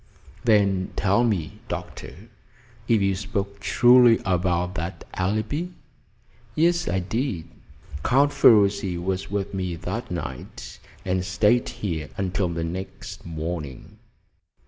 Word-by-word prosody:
"Then 100 Hz, -4 st, +3 dB
tell 100 Hz, +4 st, +2 dB
me, 90 Hz, -10 st, -1 dB
Doctor, -, -, -7 dB, 0.6 s
if 110 Hz, -4 st, +3 dB
you 100 Hz, 0 st, +2 dB
spoke 100 Hz, 0 st, -4 dB
truly 120 Hz, +3 st, +6 dB
about 90 Hz, -1 st, 0 dB
that 85 Hz, +1 st, -5 dB
alibi?" 110 Hz, -, -1 dB, 0.9 s
"Yes, 170 Hz, +2 st, +2 dB
I 90 Hz, -, 0 dB
did. 95 Hz, -, -2 dB, 0.6 s
Count 140 Hz, +3 st, +3 dB
Ferruci 100 Hz, -4 st, +4 dB
was 95 Hz, +2 st, -3 dB
with 100 Hz, -1 st, -3 dB
me 90 Hz, -3 st, -2 dB
that 115 Hz, +8 st, -5 dB
night, 85 Hz, -4 st, -7 dB, 0.3 s
and 90 Hz, 0 st, 0 dB
stayed 105 Hz, +6 st, +2 dB
here 90 Hz, -, -4 dB
until 95 Hz, -1 st, -1 dB
the 85 Hz, -1 st, -3 dB
next 90 Hz, +1 st, -6 dB
morning." 80 Hz, -4 st, -6 dB
95 Hz, 115 wpm, -24 LUFS, 90-110 Hz, 0.9 s, truly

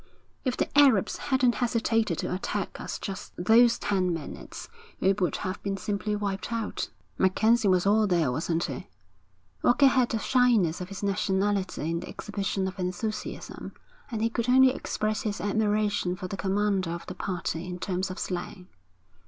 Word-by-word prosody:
'If 255 Hz, -2 st, -1 dB
the -, -, +1 dB
Arabs 270 Hz, -9 st, +5 dB
hadn't 260 Hz, -3 st, +4 dB
hesitated 225 Hz, -6 st, +1 dB
to -, -, -2 dB
attack 185 Hz, -, -3 dB
us -, -, -4 dB
just 195 Hz, -2 st, -6 dB
those 230 Hz, +6 st, +5 dB
ten 185 Hz, -3 st, 0 dB
minutes, 165 Hz, -4 st, -6 dB, 0.3 s
we 195 Hz, -, +3 dB
would 185 Hz, -3 st, 0 dB
have 185 Hz, -1 st, -4 dB
been 195 Hz, -1 st, -2 dB
simply 205 Hz, +2 st, -2 dB
wiped 200 Hz, 0 st, -3 dB
out.' 230 Hz, -2 st, -2 dB, 0.3 s
'MacKenzie 220 Hz, +4 st, +3 dB
was 185 Hz, -1 st, +3 dB
all 210 Hz, +1 st, +4 dB
there, 170 Hz, -8 st, +2 dB
wasn't 165 Hz, +5 st, -1 dB
he?' 135 Hz, -7 st, -5 dB, 0.7 s
Walker 260 Hz, +3 st, +4 dB
had 255 Hz, -2 st, +4 dB
the 225 Hz, -, 0 dB
shyness 220 Hz, -8 st, +2 dB
of 180 Hz, -, -6 dB
his 195 Hz, 0 st, -7 dB
nationality 195 Hz, -3 st, 0 dB
in 170 Hz, -, -1 dB
the 180 Hz, -, -8 dB
exhibition 200 Hz, -2 st, -2 dB
of 190 Hz, 0 st, -7 dB
enthusiasm, 185 Hz, +4 st, -4 dB, 0.4 s
and 225 Hz, -3 st, -2 dB
he 230 Hz, -, +2 dB
could 235 Hz, +1 st, -1 dB
only 260 Hz, 0 st, +6 dB
express 215 Hz, -4 st, -2 dB
his 210 Hz, -6 st, -3 dB
admiration 205 Hz, -1 st, +1 dB
for 185 Hz, -1 st, -6 dB
the 195 Hz, -, -5 dB
commander 195 Hz, -2 st, 0 dB
of 170 Hz, 0 st, -5 dB
the -, -, -6 dB
party 175 Hz, -3 st, -3 dB
in 180 Hz, 0 st, -5 dB
terms 185 Hz, +1 st, -2 dB
of 185 Hz, -, -6 dB
slang. 180 Hz, +1 st, -5 dB
200 Hz, 170 wpm, -27 LUFS, 185-220 Hz, 0.7 s, only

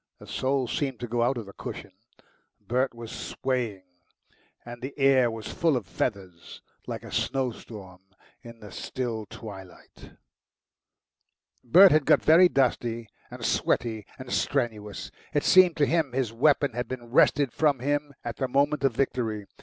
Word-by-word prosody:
The -, -, -14 dB
soul 130 Hz, -1 st, -1 dB
seemed 135 Hz, +1 st, -2 dB
to 120 Hz, -, -3 dB
go 120 Hz, +1 st, -1 dB
out 120 Hz, +2 st, +1 dB
of 115 Hz, -, -5 dB
the 100 Hz, -, -12 dB
cushion -, -, -8 dB, 0.7 s
Bert 125 Hz, +1 st, -1 dB
was 115 Hz, -1 st, -8 dB
swaying, 120 Hz, -7 st, -3 dB, 0.8 s
and 120 Hz, 0 st, -9 dB
the 130 Hz, +3 st, -7 dB
air 135 Hz, -3 st, +4 dB
was 110 Hz, -2 st, -7 dB
full 165 Hz, -5 st, +2 dB
of 115 Hz, -, -5 dB
feathers, 95 Hz, -5 st, -5 dB, 0.2 s
like -, -, -5 dB
a -, -, -10 dB
snowstorm 110 Hz, -8 st, -4 dB, 0.4 s
in 115 Hz, -1 st, -13 dB
the 105 Hz, -2 st, -11 dB
still 115 Hz, -1 st, -4 dB
twilight. 95 Hz, -4 st, -12 dB, 1.5 s
Bert 180 Hz, +10 st, +7 dB
had 155 Hz, -2 st, +3 dB
got -, -, +4 dB
very 175 Hz, +3 st, +6 dB
dusty 120 Hz, -, 0 dB, 0.2 s
and -, -, -7 dB
sweaty 110 Hz, -3 st, 0 dB
and 130 Hz, -2 st, -9 dB
strenuous. 110 Hz, -6 st, -2 dB, 0.2 s
It 145 Hz, -, +2 dB
seemed 185 Hz, -2 st, +6 dB
to 145 Hz, -, +4 dB
him 155 Hz, -4 st, 0 dB
his 125 Hz, -4 st, -1 dB
weapon 140 Hz, +2 st, +2 dB
had 120 Hz, +2 st, -3 dB
been 120 Hz, -2 st, -7 dB
wrested 140 Hz, 0 st, +3 dB
from 150 Hz, -3 st, +2 dB
him 145 Hz, +3 st, -1 dB
at 120 Hz, -2 st, -5 dB
the 130 Hz, -, -1 dB
moment 140 Hz, +3 st, +1 dB
of 135 Hz, -3 st, +2 dB
victory. 115 Hz, -6 st, -1 dB
125 Hz, 155 wpm, -27 LUFS, 115-140 Hz, 1.5 s, Bert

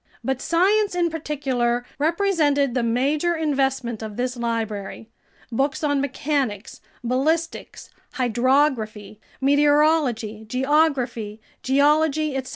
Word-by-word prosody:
But 265 Hz, -1 st, -2 dB
science, 395 Hz, +4 st, +2 dB
in 345 Hz, -2 st, +1 dB
particular, 260 Hz, -6 st, -1 dB
represented 305 Hz, -5 st, +1 dB
the 250 Hz, -, 0 dB
major 280 Hz, +9 st, +1 dB
investment 270 Hz, -7 st, -1 dB
of 215 Hz, -2 st, -7 dB
this 250 Hz, +1 st, -2 dB
library: 225 Hz, -2 st, -4 dB, 0.4 s
books 270 Hz, +5 st, -1 dB
on 285 Hz, -2 st, +1 dB
mechanics, 270 Hz, -5 st, -2 dB, 0.2 s
ballistics, 310 Hz, +7 st, -2 dB, 0.2 s
hydrography, 240 Hz, -4 st, 0 dB, 0.2 s
meteorology, 285 Hz, -6 st, +2 dB
geography, 255 Hz, -4 st, 0 dB, 0.2 s
geology, 300 Hz, +2 st, +2 dB
etc. 265 Hz, -1 st, -3 dB
270 Hz, 95 wpm, -23 LUFS, 240-300 Hz, 0.4 s, science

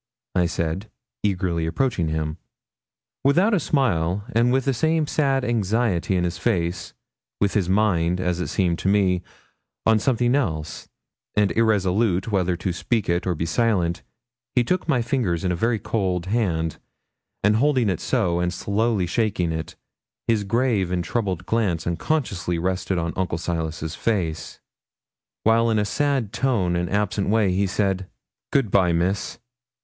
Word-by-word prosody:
I 90 Hz, -1 st, +2 dB
said, 85 Hz, +5 st, -3 dB, 0.3 s
eagerly 90 Hz, -5 st, 0 dB
approaching 105 Hz, -3 st, 0 dB
him. 80 Hz, +1 st, -2 dB, 0.8 s
Without 180 Hz, +11 st, +4 dB
a 200 Hz, -, +4 dB
smile, 100 Hz, -, 0 dB
with 125 Hz, +3 st, +2 dB
the 135 Hz, -, +2 dB
same 160 Hz, +5 st, +1 dB
sad 135 Hz, -3 st, +1 dB
anxiety 110 Hz, -4 st, +1 dB
in 90 Hz, -, +1 dB
his 85 Hz, 0 st, -2 dB
face, 85 Hz, 0 st, -1 dB, 0.4 s
with 100 Hz, -1 st, +1 dB
his 95 Hz, -4 st, +1 dB
mind, 90 Hz, -4 st, +2 dB
as 90 Hz, -1 st, -1 dB
it 90 Hz, -, -2 dB
seemed 85 Hz, -3 st, 0 dB
to -, -, -2 dB
me, 95 Hz, -3 st, +3 dB, 0.6 s
on 110 Hz, -1 st, +4 dB
something 120 Hz, +1 st, +1 dB
else, 85 Hz, -, -2 dB, 0.5 s
and 105 Hz, -1 st, +3 dB
irresolute 105 Hz, -2 st, +1 dB
whether 90 Hz, -3 st, +1 dB
to 90 Hz, 0 st, -2 dB
speak 110 Hz, +4 st, -1 dB
it 85 Hz, +2 st, 0 dB
or 90 Hz, -, +1 dB
be 80 Hz, -, -2 dB
silent, 90 Hz, -2 st, +1 dB, 0.5 s
he 125 Hz, -, +4 dB
took 180 Hz, +9 st, -1 dB
my 130 Hz, -7 st, +2 dB
fingers 115 Hz, -10 st, 0 dB
in 90 Hz, -, +1 dB
a -, -, 0 dB
very 115 Hz, +6 st, +1 dB
cold 95 Hz, -5 st, -1 dB
hand, 90 Hz, -7 st, -1 dB, 0.6 s
and 105 Hz, +1 st, +4 dB
holding 130 Hz, -2 st, +2 dB
it 95 Hz, -4 st, 0 dB
so, 90 Hz, -9 st, 0 dB
and 90 Hz, +1 st, -1 dB
slowly 105 Hz, -1 st, 0 dB
shaking 90 Hz, -2 st, 0 dB
it, 80 Hz, -2 st, -5 dB, 0.5 s
his 110 Hz, -3 st, +2 dB
grave 105 Hz, -3 st, +1 dB
and 90 Hz, -1 st, 0 dB
troubled 95 Hz, -2 st, -2 dB
glance 95 Hz, -8 st, 0 dB
unconsciously 90 Hz, -, -1 dB
rested 90 Hz, +2 st, -1 dB
on 85 Hz, 0 st, -2 dB
Uncle 90 Hz, -3 st, -1 dB
Silas's 80 Hz, -1 st, -3 dB
face, 85 Hz, -6 st, -2 dB, 0.8 s
while 115 Hz, +1 st, +4 dB
in 110 Hz, -, +2 dB
a 105 Hz, -, +1 dB
sad 135 Hz, -2 st, 0 dB
tone 115 Hz, -9 st, +1 dB
and 85 Hz, 0 st, -1 dB
absent 100 Hz, -1 st, 0 dB
way 105 Hz, -3 st, +3 dB
he 95 Hz, +2 st, +1 dB
said 95 Hz, -1 st, -1 dB, 0.4 s
'Good 130 Hz, -8 st, +1 dB
bye, 90 Hz, -3 st, +4 dB
Miss.' 90 Hz, +4 st, -1 dB
95 Hz, 155 wpm, -23 LUFS, 85-115 Hz, 0.8 s, Without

